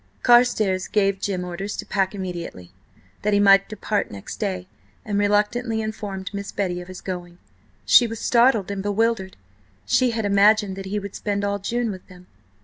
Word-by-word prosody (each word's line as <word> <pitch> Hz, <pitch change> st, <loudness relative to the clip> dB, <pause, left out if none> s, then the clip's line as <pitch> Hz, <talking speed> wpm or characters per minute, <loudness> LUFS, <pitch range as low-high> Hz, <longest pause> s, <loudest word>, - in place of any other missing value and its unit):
Carstares 220 Hz, -6 st, +4 dB
gave 195 Hz, -2 st, +1 dB
Jim 190 Hz, -3 st, -2 dB
orders 195 Hz, +3 st, -5 dB
to -, -, -5 dB
pack 195 Hz, 0 st, -1 dB
immediately, 175 Hz, -, -6 dB, 0.5 s
that 210 Hz, 0 st, 0 dB
he 205 Hz, -, +4 dB
might 195 Hz, -1 st, +5 dB
depart 215 Hz, -1 st, -2 dB
next 100 Hz, -1 st, -8 dB
day, 185 Hz, -4 st, -3 dB, 0.4 s
and 205 Hz, -1 st, -1 dB
reluctantly 210 Hz, +3 st, +1 dB
informed 205 Hz, -3 st, -5 dB
Miss 200 Hz, 0 st, -5 dB
Betty 180 Hz, -3 st, -2 dB
of 175 Hz, -, -11 dB
his 185 Hz, 0 st, -9 dB
going. 175 Hz, -2 st, -6 dB, 0.5 s
She 240 Hz, -, +6 dB
was 225 Hz, -1 st, -6 dB
startled 235 Hz, -6 st, +3 dB
and 200 Hz, -1 st, -3 dB
bewildered. 205 Hz, -1 st, -1 dB, 0.5 s
She 255 Hz, -1 st, +3 dB
had 225 Hz, -2 st, -2 dB
imagined 205 Hz, 0 st, +4 dB
that 195 Hz, 0 st, -7 dB
he 205 Hz, +2 st, -2 dB
would 200 Hz, -1 st, -5 dB
spend 205 Hz, -1 st, -2 dB
all 200 Hz, 0 st, -1 dB
June 235 Hz, +3 st, -1 dB
with 185 Hz, -2 st, -10 dB
them. 180 Hz, -1 st, -15 dB
200 Hz, 175 wpm, -23 LUFS, 190-215 Hz, 0.5 s, She